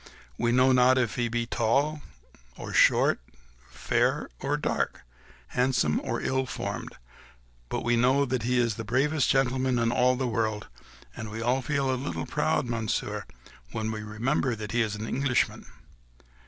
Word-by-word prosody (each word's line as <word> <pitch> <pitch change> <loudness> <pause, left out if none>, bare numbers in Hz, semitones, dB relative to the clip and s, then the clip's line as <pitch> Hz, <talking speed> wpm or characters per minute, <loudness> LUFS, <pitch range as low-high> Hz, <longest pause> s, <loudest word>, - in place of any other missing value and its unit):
We 120 - 0
know 130 +2 +4
not 130 0 +5
if 120 -4 +1
he 120 -1 0
be 120 0 -1
tall 135 +7 +1 0.6
or - - -7
short, - - +4 0.5
fair - - 0
or - - -1
dark, - - -2 0.5
handsome 125 - +1
or - - -2
ill 130 0 -1
formed; - - -5 0.7
but - - -2
we 120 0 +2
know 130 +4 +3
that 130 -2 -1
he 125 +3 0
is 120 -3 +1
the 115 - -4
bravest 135 +6 +1
gentleman 130 -1 +2
in 115 0 +1
all 125 +1 +3
the 130 +1 -2
world, 110 -2 -1 0.5
and 110 - -6
we 110 +2 -6
all 125 +3 +1
feel 135 0 0
a 130 - -3
little 80 -9 -3
proud, - - 0
Monsieur, 115 -2 -2 0.5
when 110 0 -2
we 110 -1 -4
remember 115 +4 -1
that 105 -1 -6
he 120 - +2
is 105 -2 -1
an 110 +1 -5
Englishman." 130 0 0
120 Hz, 165 wpm, -27 LUFS, 110-130 Hz, 0.7 s, not